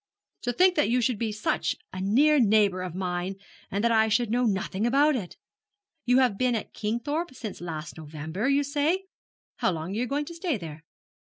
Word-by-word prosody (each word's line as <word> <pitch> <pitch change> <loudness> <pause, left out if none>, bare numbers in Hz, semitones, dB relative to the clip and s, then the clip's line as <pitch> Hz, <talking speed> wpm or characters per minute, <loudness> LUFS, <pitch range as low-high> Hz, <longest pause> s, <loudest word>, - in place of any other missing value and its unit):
'To 245 - -1
think 365 +7 +5
that 295 - +2
you 245 +2 +3
should 240 -2 0
be 225 -2 -1
such 210 0 -1 0.2
a 185 - -4
near 280 +10 +4
neighbour 205 -5 +3
of 180 -2 -5
mine, 180 0 -2 0.3
and 200 +2 -2
that 235 - +3
I 220 -1 +4
should 220 +1 +1
know 245 +1 +2
nothing 200 +1 0
about 285 +4 +4
it! 195 -8 -5 0.7
You 250 +1 +4
have 250 -7 +3
been 250 -1 +2
at 220 - -5
Kingthorpe 260 +8 -2
since 215 -8 -7
last 160 -2 -6
November, 160 - -3
you 280 +1 +3
say? 295 +6 0 0.5
How - - +1
long 165 +1 -4
are 210 - -2
you 250 - 0
going 285 +3 -1
to 340 - -8
stay 335 - -1
there?' 160 -4 -8
225 Hz, 200 wpm, -27 LUFS, 190-275 Hz, 0.7 s, think